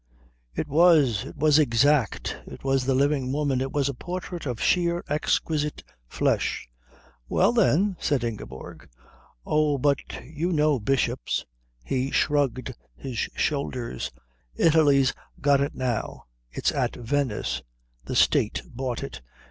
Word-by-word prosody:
"It - - -2
was. 145 - +4
It 140 - -10
was 150 +1 +4
exact. 140 -2 +2
It - - -10
was 135 -1 +1
the 135 0 +2
living 140 -1 +1
woman. 140 -2 0
It 135 0 -2
was 140 -2 +1
a 140 - -2
portrait 175 +3 -6
of 120 -3 -3
sheer, 175 -1 +1
exquisite 150 0 -1 0.2
flesh." - - 0 0.6
"Well, - - +3
then," 200 -4 +3
said 140 -5 0
Ingeborg. 110 - -7 0.6
"Oh, 150 -2 +2
but 140 +1 +2 0.3
you 160 +5 -3
know 150 -3 +3
bishops 135 +4 0 0.2
" - - -42 0.2
He 130 +1 -1
shrugged 140 -4 0 0.2
his 120 - -6 0.2
shoulders. 130 - -2 0.5
"Italy's 145 -5 +4 0.3
got 140 -1 +3
it 140 - -2
now. 125 -3 -3 0.3
It's - - 0
at - - -1
Venice. 125 -2 -1 0.4
The - - -4
State - - +2
bought 125 -1 -4
it. - - -7
140 Hz, 130 wpm, -25 LUFS, 130-150 Hz, 0.6 s, was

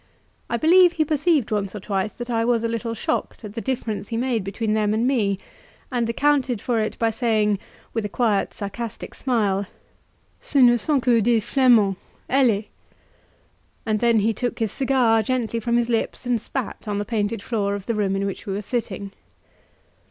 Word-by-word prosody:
I 235 - 0
believe 350 +5 +6
he 315 -2 +1
perceived 300 -4 +1
once 205 -1 -1
or - - -4
twice 195 +1 -2
that 240 0 -6
I 230 -1 +1
was 230 -1 +1
a - - +1
little 230 0 -3
shocked 225 - -3
at 205 - -8
the 230 - -4
difference 225 -5 -3
he 225 - -3
made 240 -3 0
between 210 +3 -2
them 215 -1 +1
and 225 +2 +1
me, 215 -7 +1 0.5
and 240 -2 0
accounted 270 -2 +1
for 235 +2 0
it 215 - -2
by 230 -1 +1
saying, 215 -3 +1 0.3
with 225 - -1
a 210 - -3
quiet 215 -3 +1
sarcastic 210 +2 -6
smile 205 -6 0 0.7
"Ce - - -6
ne 245 -3 +7
sont 275 +3 0
que 235 -3 +4
des 230 +1 +3
Flamands 225 -5 +4 0.3
allez!" 245 -6 +3 1.2
And 215 -1 0
then 235 0 +3
he 225 +2 +2
took 245 +2 -3
his 220 -3 -1
cigar 250 -4 +3
gently 235 0 -1
from 235 +1 +1
his 240 -1 +1
lips 235 +1 -1
and 240 -3 0
spat 250 -2 -5
on 205 -1 -1
the 205 - -2
painted 210 -1 -2
floor 200 -3 -1
of 200 -1 -7
the 230 - -1
room 200 -3 0
in 195 0 -1
which 200 +2 -5
we 195 - -2
were 205 +2 -3
sitting. 200 -4 -3
230 Hz, 190 wpm, -23 LUFS, 210-245 Hz, 1.2 s, ne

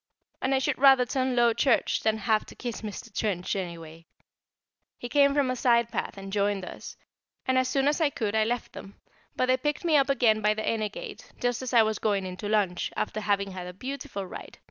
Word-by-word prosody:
And 270 +1 +1
I - - +3
should 265 - -1
rather 270 -2 +6
turn 260 0 -1
Low 240 -1 +4
Church 235 +2 +2
than 220 0 +1
have 215 0 +1
to - - -12
kiss 240 -3 -5
Mr. 215 0 -8
Trench, 190 -4 -1
anyway. 165 -3 -7 0.9
He 245 - -6
came 280 0 +4
from 275 -3 +2
a - - -2
side 235 -2 +2
path - - -3
and 195 0 -8
joined 200 -2 0
us, - - -9 0.5
and 260 - +1
as 255 0 +3
soon 275 +1 +1
as 295 +3 +1
I 310 - +4
could 220 -6 -3
I 220 0 +3
left 240 +2 -3
them; 195 - -10 0.4
but - - +1
they 255 0 +3
picked 295 +5 -2
me 315 -3 +4
up 275 -1 +2
again 230 -5 +3
by 210 0 +2
the 220 - -4
inner 215 -2 0
gate, 475 - -9
just 245 -1 -1
as 255 - -4
I 235 -3 +6
was 215 -1 -1
going 200 -3 0
in 185 -1 -5
to 205 +2 -5
lunch, 200 -5 0
after 215 0 -2
having 200 -1 0
had 180 -1 -7
a 180 - -7
beautiful 230 -2 -6
ride. 180 - -10
225 Hz, 230 wpm, -27 LUFS, 200-260 Hz, 0.9 s, rather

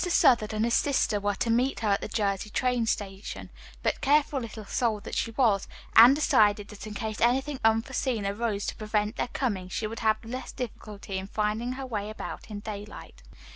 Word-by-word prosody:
Southard 235 -9 +4
and 215 +1 0
his 235 - 0
sister 260 -7 +2
were 205 0 0
to 230 - 0
meet 250 +3 +1
her 215 - +1
at 200 - +2
the - - -4
Jersey 205 -1 -1 0.4
station, 195 -2 -4 0.3
but - - 0
careful 290 0 +3
little 225 -3 -7
soul 225 -1 0
that - - -9
she - - 0
was, 220 -4 +2 0.3
Anne 240 +4 +10
decided 210 -8 +3
that 210 0 -9
in 210 - -7
case 220 0 -4
anything 265 +4 +2
unforeseen 225 0 +1
arose 205 0 -1
to - - -3
prevent 210 +1 -1
their - - 0
coming, 205 -8 -2
she 215 - -2
would 225 +2 -5
have 220 0 +1
less 250 +3 -6
difficulty 210 -5 -6
in 190 - -7
finding 215 +4 -1
her 265 +1 -6
way 210 -4 -3
about 215 - -7
in 205 -1 -6
daylight. 205 - -8
220 Hz, 190 wpm, -28 LUFS, 205-240 Hz, 0.4 s, Anne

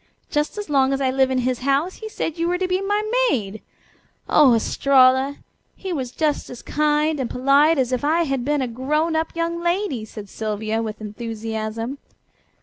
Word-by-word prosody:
Just 295 +6 -1
as 415 - -4
long 275 -2 +2
as 270 - -1
I 265 -2 +1
live 265 0 +2
in 260 - 0
his 255 -1 0
house 280 +7 0
he 440 - -7
said 325 -6 -3
you 335 - +1
were 355 +1 +1
to 370 0 -1
be 365 +1 0
my 410 +2 0 0.3
maid! 215 - -2 0.7
Oh, 270 -6 +6
Estralla! 260 +3 +3 0.4
He 380 -2 -5
was 260 -6 -3
just 300 +3 -1
as 245 - -9
kind 300 0 +1
and 255 - -2
polite 280 +5 +3
as 260 -2 +1
if 255 0 -1
I 320 +4 +2
had 270 -5 -2
been 290 +1 0
a - - -2
grown 300 +7 -1
up 320 +1 -1
young 335 0 -2
lady," 345 - -1
said 210 -1 -9
Sylvia 215 +2 -3
with 215 -1 -5
enthusiasm. 225 +3 -5
275 Hz, 190 wpm, -22 LUFS, 240-320 Hz, 0.7 s, Oh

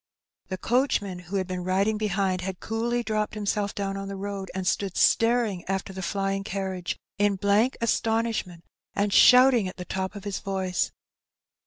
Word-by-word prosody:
The 185 - -4
coachman, 205 -5 0
who 180 +2 -7
had 190 -1 +1
been 180 -1 -4
riding 195 +4 +1
behind, 195 -3 0
had 185 0 -5
coolly 235 +2 -1
dropped 215 -1 -1
himself 205 -1 -1
down 195 -1 -2
on 195 0 -5
the 195 - -5
road, 195 -1 -5
and 190 -1 -3
stood 195 0 -1
staring 230 -5 +3
after 195 0 -3
the 190 - -6
flying 195 +1 -1
carriage 190 -3 -3 0.2
in 205 -1 +3
blank 205 +6 +2
astonishment, 225 -6 0 0.3
and 205 0 +1
shouting 250 -4 +7
at 185 - -8
the 180 - -6
top 190 +2 -3
of 200 - -8
his 205 -2 -3
voice. 190 -2 -1
195 Hz, 170 wpm, -26 LUFS, 190-215 Hz, 0.3 s, shouting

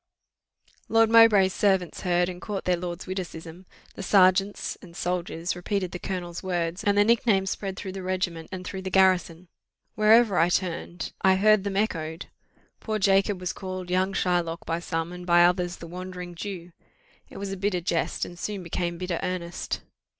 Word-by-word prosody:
_' - - -29 0.2
"Lord 225 0 +4
Mowbray's 215 -5 +6
servants 190 -4 +1
heard, 175 -1 +2
and 180 0 -7
caught 205 -2 -4
their 180 - +3
lord's 175 0 -5
witticism: 180 -1 -7 0.3
the - - -8
serjeants 195 +1 +3
and 170 -3 -14
soldiers 175 -1 -2
repeated 185 0 -2
the 180 - -6
colonel's 175 -3 -5
words, 175 -2 -2
and 205 0 +2
the 205 - +6
nicknames 210 -4 +2
spread 195 -2 -4
through 190 - -5
the 190 0 -6
regiment, 180 -3 -3
and 185 -1 -6
through 190 +1 -5
the 190 - -4
garrison; 185 -2 +2 0.5
wherever 215 -2 +5
I 165 +1 +4
turned, 175 -1 -2
I 190 0 +5
heard 215 +1 +4
them 200 -1 -2
echoed: 165 -6 -2 0.5
poor 215 -1 -2
Jacob 195 0 +2
was 180 0 -3
called 185 -2 -6
young 185 +1 +1
Shylock 175 -3 -1
by 165 +1 -1
some, 165 -1 -3
and 180 0 -8
by 175 -1 +5
others 180 0 +1
the - - -10
Wandering 180 0 -7
Jew. 180 -1 -7 0.6
It - - -11
was 200 -1 -4
a - - -3
bitter 195 -1 -1
jest, 170 -1 -1
and 175 0 -11
soon 200 -1 -4
became 170 0 -3
bitter 180 -1 -3
earnest. 175 -1 -4
185 Hz, 180 wpm, -26 LUFS, 175-195 Hz, 0.6 s, Mowbray's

